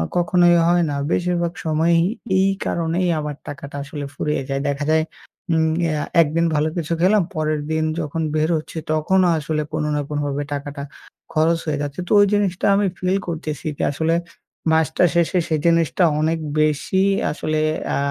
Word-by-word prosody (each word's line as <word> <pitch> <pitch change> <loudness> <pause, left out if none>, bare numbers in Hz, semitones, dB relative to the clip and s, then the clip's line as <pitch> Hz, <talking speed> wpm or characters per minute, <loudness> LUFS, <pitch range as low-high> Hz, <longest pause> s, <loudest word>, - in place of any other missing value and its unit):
কখনোই 175 0 +4
হয় 175 0 +3
না। 145 - -2 0.2
বেশিরভাগ 175 -1 0
সময়েই 165 +2 +3 0.4
এই 195 +1 +3 0.2
কারণেই 170 +2 0
আমার 150 -1 -4
টাকাটা 140 0 -8
আসলে 145 0 -6
ফুরিয়ে 150 0 -1
যায়। 135 0 -1
দেখা 140 +1 -2
যায়, 160 0 +3 0.5
উম 160 0 +3 0.2
অ্যা 155 -2 -1 0.2
১ 155 - +3
দিন 170 0 +3
ভালো 150 +1 +2
কিছু 170 0 -2
খেলাম, 195 +1 +4
পরের 155 -1 -1
দিন 160 0 +1 0.2
যখন 160 +1 -3
বের 155 +2 +1
হচ্ছি, 155 +1 -8
তখনও 180 +4 +2
আসলে 155 0 -2
কোনো 155 -1 -1
না 145 - 0
কোনোভাবে 145 -1 -2
টাকাটা 140 0 -5 0.5
খরচ 165 +1 +3
হয়ে 150 -2 -1
যাচ্ছে। 145 +3 -5
তো - - -8
ওই 205 - +7
জিনিসটা 195 -3 0
আমি 205 0 +2
feel 185 +2 0
করতেছি 155 -3 -4
যে - - -2
আসলে 160 +3 0 0.6
মাসটা 160 +1 +2
শেষে 170 +2 +2
সেই 155 -3 0
জিনিসটা 170 +1 +3 0.2
অনেক 160 +1 +1 0.2
বেশি 155 +5 +1 0.3
আসলে 155 0 -2 0.4
আ - - 0
160 Hz, 170 wpm, -21 LUFS, 150-170 Hz, 0.6 s, ওই